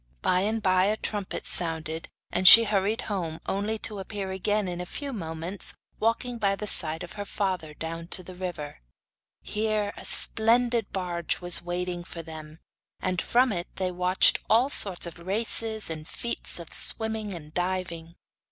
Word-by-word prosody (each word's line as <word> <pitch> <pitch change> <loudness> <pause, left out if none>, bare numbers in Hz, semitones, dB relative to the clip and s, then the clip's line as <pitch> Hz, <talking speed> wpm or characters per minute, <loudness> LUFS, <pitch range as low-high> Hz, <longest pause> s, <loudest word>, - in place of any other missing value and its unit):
By 180 - +2
and 215 +3 -2
by 185 0 +2
a 210 +2 0
trumpet 205 -3 -4
sounded, 160 -1 +4 0.2
and 185 +1 +2
she 230 +4 +12
hurried 210 0 -1
home, 170 -6 -5
only 205 +3 -2
to 210 -3 -1
appear 195 0 -6
again 205 +2 -1
in 175 0 -5
a - - -6
few 280 +6 -6
moments 165 -1 -4 0.2
walking 235 +2 -2
by 195 -2 +1
the 210 - -6
side 160 -5 +4
of 175 - -9
her 205 - -6
father 185 -7 -4
down 165 +1 -7
to 185 - -2
the 185 - -11
river. 175 - -7 0.6
Here 215 -1 -2
a - - -10
splendid 235 0 +3
barge 175 -3 -3
was 175 -1 +4
waiting 175 0 -4
for 170 -1 -9
them, 155 -1 -10 0.4
and 185 -1 -2
from 250 +1 +2
it 175 -3 -4
they 185 -1 -3
watched 180 +1 +2
all 245 +5 +3
sorts 190 -9 +2
of 170 0 -9
races 220 +3 0
and 155 -1 -6
feats 235 - -5
of 170 -2 -8
swimming 220 -2 +2
and 155 -2 -12
diving. 180 -2 -4
185 Hz, 170 wpm, -26 LUFS, 170-215 Hz, 0.6 s, she